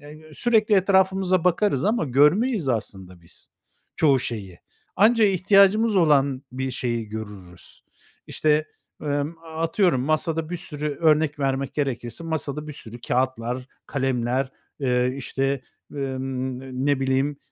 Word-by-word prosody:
ııı, 155 +1 -13
sürekli 220 -3 +2
etrafımıza 190 -1 +2
bakarız 180 -5 +2
ama 215 -5 +1
görmeyiz 150 - +3
aslında 95 -6 -4
biz 85 - -13 0.5
çoğu 140 -4 +4
şeyi. 100 -8 -5 0.4
Anca 225 +1 +5
ihtiyacımız 200 +3 +4
olan 140 -5 +3
bir 130 0 -3
şeyi 120 -3 -3
görürüz. 105 -5 -10 0.4
İşte, 155 0 +1 0.4
ımm, 145 +2 -2 0.2
atıyorum, 165 -3 +2
masada 155 +3 -1
bir 175 - -2
sürü, 150 -4 -5
örnek 155 -2 +3
vermek 135 0 -1
gerekirse, 135 +1 -3
masada 150 -2 -3
bir - - -5
sürü 120 -3 -10
kâğıtlar, 125 0 -1 0.2
kalemler, 130 -1 -1 0.3
eee, 125 -1 +1
işte, 135 0 -2 0.3
ımm, 130 -2 -3
n 135 0 -10 0.2
ne 145 -2 +2
bileyim, 135 +2 0
140 Hz, 125 wpm, -24 LUFS, 130-165 Hz, 0.5 s, Anca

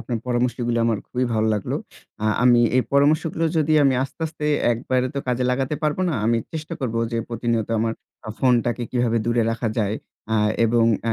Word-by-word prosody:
আপনার 120 0 -3
পরামর্শগুলো 120 -1 0
আমার 110 -3 +1
খুবই 125 0 -1
ভালো 110 0 +1
লাগলো। 105 - -2 0.5
আ - - +2 0.2
আমি 120 -1 +6 0.2
এই 130 - +4
পরামর্শগুলো 155 +3 +2
যদি 155 0 +2
আমি 135 -1 +4
আস্তে, 135 - -12
আস্তে, 155 -1 -5 0.3
একবারে 125 +2 0
তো 140 - -1
কাজে 125 0 0
লাগাতে 135 +3 -1
পারবো 150 +3 0
না। 165 - -1
আমি 115 0 +3 0.2
চেষ্টা 160 +1 -5
করব 120 -4 -2 0.2
যে - - 0
প্রতিনিয়ত 115 -1 -1
আমার 115 +1 0 0.3
আ - - -6
ফোনটাকে 120 -1 +2
কিভাবে 120 -2 +1
দূরে 120 0 +2
রাখা 115 0 -2
যায়, 105 -1 0 0.3
অ্যা 110 - +1 0.3
এবং, 115 0 +3 0.2
অ্যা 115 - +1
120 Hz, 190 wpm, -22 LUFS, 115-135 Hz, 0.5 s, আমি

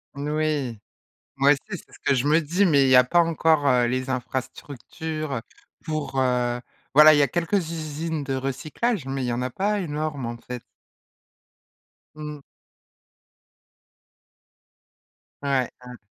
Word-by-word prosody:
N 140 +1 -4
oui. 150 -7 -1 0.6
Moi 140 +1 +4
aussi 140 - +4
c'est 185 -5 -8
ce - - -15
que 140 - +3
je 130 +2 0
me 155 +3 +4
dis 175 +6 +1
mais 145 -6 +4
il - - +3
y 130 - +7
a 125 - +8
pas 175 +7 +3
encore, 160 -3 +2
heu, 125 -3 +4
les 130 +2 -2
infrastructures, 140 +4 -5
heu, 115 - -3 0.4
pour, 150 -4 -3
heu, 125 -1 +1 0.3
voilà, 155 +1 +9
il - - +3
y - - +5
a 140 - +3
quelques 175 +6 -2
usines 160 -2 -4
de 135 -1 -2
recyclage 150 - -2
mais 135 -1 -2
il - - -1
y 120 - -1
en 120 +1 -2
a 125 - -2
pas 205 - 0
énorme, 150 -5 -3
en 120 0 -4
fait. 125 0 -8 1.5
Mmh. 150 -1 -7 3.0
Ouais, 135 -3 +1 0.2
ouais. 125 -1 -10
145 Hz, 155 wpm, -24 LUFS, 130-155 Hz, 3.0 s, voilà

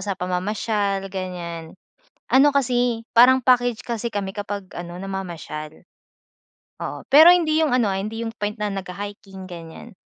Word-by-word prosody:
sa 195 0 -3
pamamasyal, 195 +2 -1
ganyan. 175 -3 -6 0.6
Ano 280 +2 +5
kasi, 245 -3 +1
parang 255 +2 +6
package 245 -2 +3
kasi 235 -1 -3
kami 195 -2 -2
kapag 205 -2 -6
ano, 175 0 -7
namamasyal. 175 -5 -7 1.0
Oo. - - -6
Pero 305 +5 +9
hindi 320 -3 +2
yung 310 -4 +2
ano, 230 -5 +2
ah, - - -1
hindi 225 +3 -4
yung 225 - -4
point 210 +2 -3
na 210 0 -2
nagha-hiking 195 0 -7
ganyan. 170 +6 -10
205 Hz, 145 wpm, -22 LUFS, 185-240 Hz, 1.0 s, Pero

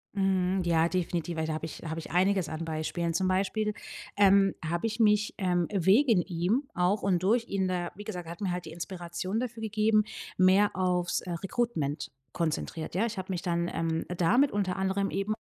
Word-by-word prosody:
Mhm. 190 -1 +1
Ja, 165 -1 +3
definitiv, 175 -1 -2
weil 160 - -1
da 160 - -2
habe 160 +1 -4
ich 160 - -9
habe 160 0 -4
ich 160 - -7
einiges 185 -1 +2
an 160 +1 -4
Beispielen. 165 +1 -2
Zum 185 +3 +1
Beispiel, 200 +3 0 0.4
ähm, 195 -1 +5
habe 170 +7 -1
ich 225 +1 -4
mich, 210 -1 +3
ähm, 180 -3 +1
wegen 200 - +4
ihm 195 - -1
auch 180 +4 +1
und 185 -3 +1
durch 230 +4 +2
ihn 190 -1 0
da 175 -1 -2
wie 205 - -8
gesagt, 180 -5 -6
er 165 - -6
hat 170 - -12
mir 195 -3 -1
halt 180 0 -4
die 160 - -8
Inspiration 175 +4 -4
dafür 235 -2 -5
gegeben, 215 0 +2 0.3
mehr 190 +2 +4
aufs, 180 -1 +1
äh, 180 - -5
Recruitment 170 - -2 0.2
konzentriert, 160 -1 -3
ja? 205 +6 +2
Ich 230 -3 -5
habe 190 0 -4
mich 175 - -3
dann, 170 -1 0
ähm, 165 -1 -1
damit 245 +12 +3
unter 195 -3 -1
anderem 190 +1 0
eben 195 +2 -1
185 Hz, 200 wpm, -29 LUFS, 170-205 Hz, 0.4 s, ähm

